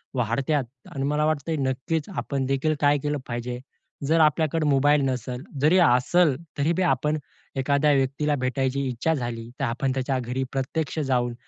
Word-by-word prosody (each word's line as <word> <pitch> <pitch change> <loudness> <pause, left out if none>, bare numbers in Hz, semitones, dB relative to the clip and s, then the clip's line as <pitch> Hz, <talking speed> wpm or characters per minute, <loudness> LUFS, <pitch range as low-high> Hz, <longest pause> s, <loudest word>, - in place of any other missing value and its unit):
वाढतात. 130 +4 0 0.3
आणि 135 - -2
मला 150 +1 +1
वाटतं 155 0 -1
आहे, 160 - 0
नक्कीच 135 +6 -2
आपणदेखील 135 +2 0
काय 145 0 +4
केलं 150 0 0
पाहिजे. 120 0 -4 0.5
जर 165 +2 +3
आपल्याकडे 155 +1 +2
मोबाईल 145 +1 +4
नसल, 125 0 -4 0.2
जरी 155 +5 +5
असल, 150 +2 +4 0.2
तरी 145 +3 +2
बी 185 - -1
आपण 150 -1 +1 0.4
एखाद्या 140 +2 +2
व्यक्तीला 140 +2 +1
भेटायची 130 +1 0
इच्छा 125 +7 0
झाली, 120 -4 -4
तर 140 - +1
आपण 130 +2 -1
त्याच्या 130 0 -1
घरी 125 +2 -2
प्रत्यक्ष 140 +4 -2
जाऊन, 125 -4 0
135 Hz, 155 wpm, -25 LUFS, 130-150 Hz, 0.5 s, जरी